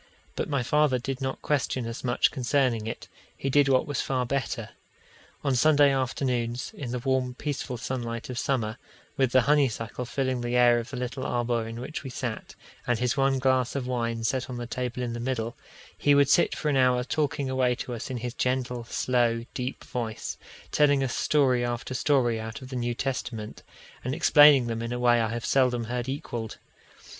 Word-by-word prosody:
But - - -2
my 140 -4 0
father 150 0 +3
did 130 +2 -4
not 130 0 -3
question 130 -4 0
us 115 0 -6
much 120 -1 +2
concerning 125 -4 +1
it; 115 - -6 0.3
he 135 - -2
did 145 0 +4
what 130 -1 +3
was 145 -3 -2
far 130 -2 -1
better. 135 0 -2 0.7
On 140 -2 +1
Sunday 145 +2 +5
afternoons, 125 -2 -1
in 135 -5 -6
the 125 - -2
warm, 130 0 0
peaceful 140 -3 -4
sunlight 115 -1 -4
of 125 -1 -4
summer, 125 -6 -1 0.4
with 130 -2 +2
the 130 - +5
honeysuckle 125 -4 +1
filling 130 -1 -1
the 120 0 -2
air 120 -1 +5
of 115 - -6
the 135 - -6
little 125 +1 -4
arbour 120 -1 -1
in 115 +1 -6
which 135 +5 -6
we 135 - -6
sat, 120 -3 -5 0.3
and 120 -1 +2
his 125 +1 0
one 135 -1 +2
glass 130 -1 +1
of 135 -3 -2
wine 115 -2 -2
set 130 +3 -1
on 125 - -5
the 120 - -4
table 125 +1 -3
in 120 -1 -3
the 120 - -4
middle, 120 -2 -2 0.4
he 145 0 +3
would 140 -1 +4
sit 170 - +4
for 155 - -1
an 140 - +2
hour 125 -1 +3
talking 145 0 -1
away 130 -1 +1
to 125 - -5
us 115 - -5
in 130 - -3
his 120 0 -4
gentle, 125 -2 -1
slow, 120 -1 +1
deep 125 +1 -4
voice, 115 -4 -4 0.4
telling 145 -2 +4
us 130 - -2
story 130 -5 +2
after 120 +1 -3
story 125 -4 +2
out 110 +3 -6
of 130 - -10
the 130 - -6
New 120 -1 -1
Testament, 115 -4 -4 0.4
and 130 +3 -2
explaining 145 -5 +7
them 115 -1 -3
in 115 0 -4
a - - -2
way 120 -1 +4
I 110 - 0
have 120 +1 -4
seldom 125 -3 +2
heard 120 +2 -3
equalled. 120 -5 -5
125 Hz, 200 wpm, -27 LUFS, 120-135 Hz, 0.7 s, explaining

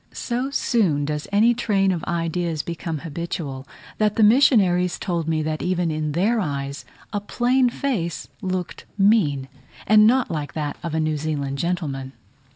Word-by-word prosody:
So 250 +2 -2
soon 190 - +1
does 150 0 -3
any 220 +4 +4
train 200 -5 +1
of 175 -3 -3
ideas 165 -2 -1
become 165 -1 -4
habitual, 150 -4 -5 0.3
that 210 -1 +2
the 225 - +3
missionaries 205 -7 +4
told 170 -4 -2
me 160 -1 0
that 155 0 -2
even 180 -2 0
in 155 -1 -2
their 210 +8 +2
eyes 140 -5 -3 0.3
a 205 - 0
plain 250 +4 +2
face 220 - -3
looked 185 -2 -4
mean, 190 -10 +3 0.4
and 215 0 +6
not 255 +2 +2
like 150 -3 -4
that 150 -2 -3
of 170 -2 -4
a - - +1
New 155 -1 0
Zealand 140 -2 -3
gentleman. 140 -6 -3
170 Hz, 160 wpm, -23 LUFS, 150-210 Hz, 0.4 s, and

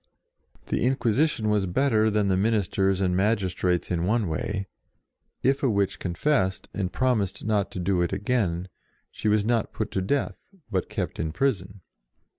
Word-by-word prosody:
The - - 0
In 130 +2 +3
quisition 120 0 +1
was 100 -2 +1
better 110 +1 +2
than 105 -1 +1
the 95 - +2
ministers 95 -2 +1
and 90 -1 +1
magistrates 95 -4 0
in 85 -1 0
one 105 +2 +1
way: 100 +5 -2 0.8
if 135 +2 +2
a 135 - +2
witch 100 -3 0
con 85 -2 -3
fessed, 95 - +1
and 95 -3 -2
promised 115 -9 0
not 105 -2 +1
to - - -4
do 90 0 +1
it 85 - 0
again, 95 -4 0 0.4
she - - -4
was 105 -1 +3
not 115 -1 0
put 110 -1 -3
to 95 - -1
death, 140 - -2 0.2
but 95 -3 -1
kept 100 -4 -4
in 80 -1 -1
prison. 95 -3 -1
100 Hz, 170 wpm, -26 LUFS, 95-115 Hz, 0.8 s, In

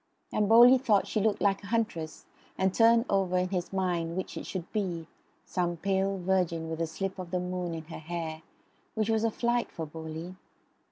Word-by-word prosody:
And 210 -1 +1
Bowley 240 +3 +8
thought 215 -6 +3
she 215 - -1
looked 210 0 +1
like 200 0 +2
a - - -8
huntress 210 -9 -2 0.3
and 190 0 +2
turned 230 +2 +5
over 190 -2 +1
in 180 0 +1
his 180 -2 -2
mind 175 -3 -1
which 185 - -4
it - - -6
should 185 -2 -5
be 180 -6 -2 0.4
some 175 -1 -1
pale 195 +2 0
virgin 175 -3 0
with 160 0 -3
a 165 - 0
slip 190 +4 -4
of 180 -2 -6
the 180 +1 -1
moon 180 -1 -3
in 160 - -6
her 160 +1 -9
hair, 160 -1 -5 0.5
which 220 0 +1
was 220 0 +1
a 230 - +3
flight 240 +2 0
for 165 - -5
Bowley. 160 +3 -7
185 Hz, 200 wpm, -29 LUFS, 170-205 Hz, 0.5 s, Bowley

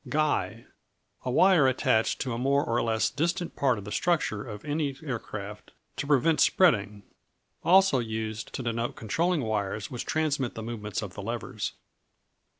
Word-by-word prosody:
Guy 155 0 0 0.6
A - - -1
wire 170 +1 +5
attached 115 -3 +2
to 125 - -2
a - - -3
more 140 +3 +2
or 115 +1 +1
less 110 -1 +1
distant 170 +5 -1
part 130 -4 +2
of 100 - -8
the 105 - -7
structure 150 -12 0
of 105 +3 -8
any 145 -2 -1
aircraft 110 -6 -6 0.2
to 140 - -3
prevent 150 +2 +3
spreading. 105 - +3 0.6
Also 190 -6 +5
used 110 -1 -4
to 130 - -4
denote 115 0 -2
controlling 165 - 0
wires 105 -2 -2
which 125 - -5
transmit 150 -5 0
the 115 - -5
movements 105 -3 -4
of - - -7
the - - -7
levers. - - -4
125 Hz, 155 wpm, -28 LUFS, 110-155 Hz, 0.6 s, wire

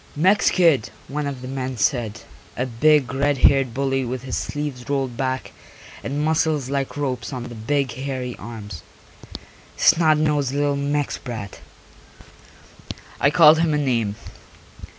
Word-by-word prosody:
"Mex 190 +7 +4
kid," 165 - +3 0.2
one 145 +1 -3
of 135 -3 -6
the - - -6
men 130 -1 -4
said, 115 -1 0 0.4
a 125 - 0
big 130 +2 +2
red 140 +1 +1
haired 135 -1 +4
bully 135 +1 -1
with 125 0 -4
his 130 - -4
sleeves 145 -4 -4
rolled 135 -3 -1
back 130 +1 -3 0.5
and 145 +2 -2
muscles 155 -4 0
like 140 0 -2
ropes 135 -2 -3
on 125 -3 -5
the 120 - -8
big 130 +3 -1
hairy 130 -1 -4
arms. 105 -6 -8 1.0
"Snot 160 -1 +4
nosed 150 -3 +1
little 145 0 +1
Mex 145 0 -1
brat." 115 -6 -7 1.6
I 140 - +4
called 160 0 +7
him 165 -2 +2
a - - +2
name. 115 -8 0
135 Hz, 145 wpm, -22 LUFS, 125-145 Hz, 1.6 s, called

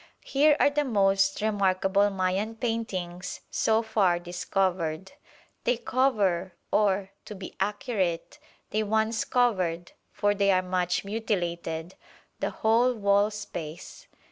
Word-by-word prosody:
Here 295 +2 +4
are 285 - +4
the 295 +1 +1
most 195 -4 +2
remarkable 200 -1 +2
Mayan 195 +3 -1
paintings 195 -6 -4
so 220 +1 +2
far 205 -6 +2
discovered. 180 0 -2 0.5
They 245 - +1
cover, 205 -8 +1 0.2
or, 195 -2 +2
to 210 - -8
be 190 -1 -9
accurate, 195 -4 -2 0.3
they 215 - +1
once 220 +1 +1
covered 185 -9 0 0.2
(for 205 0 +1
they 200 -1 +1
are 185 -1 +3
much 180 0 -1
mutilated), 175 -5 -3 0.5
the - - -1
whole 235 +3 +2
wall 200 -1 +3
space. 195 - -8
200 Hz, 115 wpm, -27 LUFS, 185-220 Hz, 0.5 s, Here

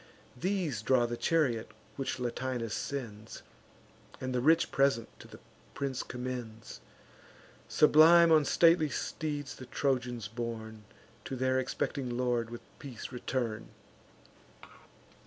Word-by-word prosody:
These 170 - -1
draw 120 +1 +3
the 120 0 -3
chariot 130 -6 +1 0.3
which 135 -1 -3
Latinus 120 -2 -3
sends, 115 -6 -5 0.8
And 130 0 -3
the 125 - 0
rich 160 +5 +4
present 135 -5 +2
to - - -12
the - - -12 0.4
prince 135 -2 -2
commends. 125 -3 -6 0.9
Sublime 165 +2 +6
on 155 -2 +6
stately 165 +1 +4
steeds 145 -3 -4
the 130 - -10
Trojans 125 -5 -1
borne, 110 -1 -6 0.4
To 135 - -4
their 130 +1 +1
expecting 125 -1 -3
lord 120 -2 0
with 120 0 -8 0.2
peace 130 -4 -8
return. 120 -3 -3
125 Hz, 115 wpm, -31 LUFS, 115-140 Hz, 0.9 s, Sublime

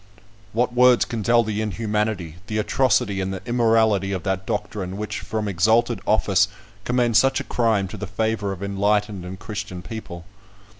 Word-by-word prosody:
What 120 +2 0
words 125 0 +5
can 115 -2 -4
tell 120 +3 +4
the 105 -1 -2
inhumanity, 105 -5 -2
the 110 - -2
atrocity, 105 -3 +1
and 95 0 -2
the 95 -1 -6
immorality 110 -5 +2
of 95 -3 -3
that 95 0 -2
doctrine 95 -2 -3
which, 105 0 -4
from 110 -1 -3
exalted 110 +4 +2
office, 100 -2 +3 0.4
commends 120 -2 +3
such 135 +1 +2
a - - -4
crime 110 -5 +1
to - - -7
the 105 - -5
favour 110 +1 -1
of 95 0 -6
enlightened 100 0 0
and 95 +1 -7
Christian 105 -3 -6
people? 90 -7 -8
105 Hz, 165 wpm, -23 LUFS, 95-115 Hz, 0.4 s, words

